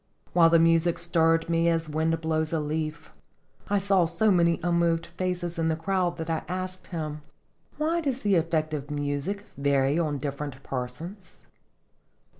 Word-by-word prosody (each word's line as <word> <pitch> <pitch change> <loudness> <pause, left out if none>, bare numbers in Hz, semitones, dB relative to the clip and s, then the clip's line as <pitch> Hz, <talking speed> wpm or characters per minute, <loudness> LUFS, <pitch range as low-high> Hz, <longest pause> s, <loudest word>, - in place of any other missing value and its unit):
While 165 -2 +6
the 165 - +6
music 165 +1 +3
stirred 165 -1 +2
me 170 0 +2
as 165 -1 0
wind 160 +1 0
blows 160 -1 0
a 165 - +1
leaf, 155 +1 -3 0.6
I 205 - +3
saw 195 -2 +3
so 210 +6 +2
many 170 -2 +3
unmoved 170 -1 +2
faces 180 -2 -3
in 165 - +1
the 160 - +1
crowd 180 +1 -1
that 160 - -4
I 165 -1 -1
asked 185 0 -5
him: 155 -3 -4 0.3
" - - -36
Why 325 +3 +1
does 270 -4 -2
the 205 -1 +2
effect 160 -2 +1
of 145 -1 -4
music 145 +8 -2
vary 140 +1 +2
on 150 -4 0
different 140 0 -5
persons?" 160 +9 -6
165 Hz, 165 wpm, -27 LUFS, 155-175 Hz, 0.6 s, While